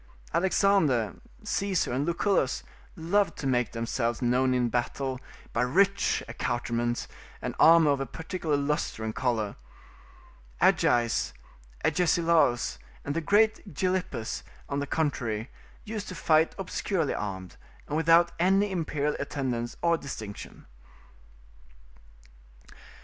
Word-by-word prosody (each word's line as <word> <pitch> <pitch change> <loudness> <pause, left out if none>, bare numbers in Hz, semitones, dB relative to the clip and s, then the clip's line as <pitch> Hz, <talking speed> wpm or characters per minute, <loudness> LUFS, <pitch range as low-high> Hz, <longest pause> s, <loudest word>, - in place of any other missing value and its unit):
Alexander, 170 - +2 0.3
Caesar, 200 -8 0
and 140 +4 -1
Lucullus 170 -5 +1 0.3
loved 175 +2 +1
to - - -6
make 125 -3 +1
themselves 115 0 -1
known 125 +1 +2
in 125 -1 +2
a - - 0
battle 130 +2 -2 0.3
by 115 - +1
rich 195 +10 +2
accoutrements 120 0 -2 0.3
and - - -4
armour 165 -2 +7
of 140 - +1
a 135 - -3
particular 160 -2 -2
lustre 140 -5 -2
and 110 0 -3
colour: 115 -5 -1 1.0
Agis, 120 - +2 0.5
Agesilaus, 165 -7 +2 0.3
and 145 - -2
that 165 -1 -3
great 215 0 +2
Gilippus, 180 -11 -2 0.3
on 140 - -2
the 145 - -3
contrary, 125 -8 -2 0.3
used 215 -1 -5
to 185 - -6
fight 160 0 +3
obscurely 185 -4 -1
armed, 95 -3 -5 0.3
and 150 - -3
without 165 +2 +5
any 195 +3 +3
imperial 150 -4 -1
attendance 125 -4 -3
or 170 -1 +3
distinction. 110 -7 -8
145 Hz, 115 wpm, -28 LUFS, 120-175 Hz, 1.0 s, armour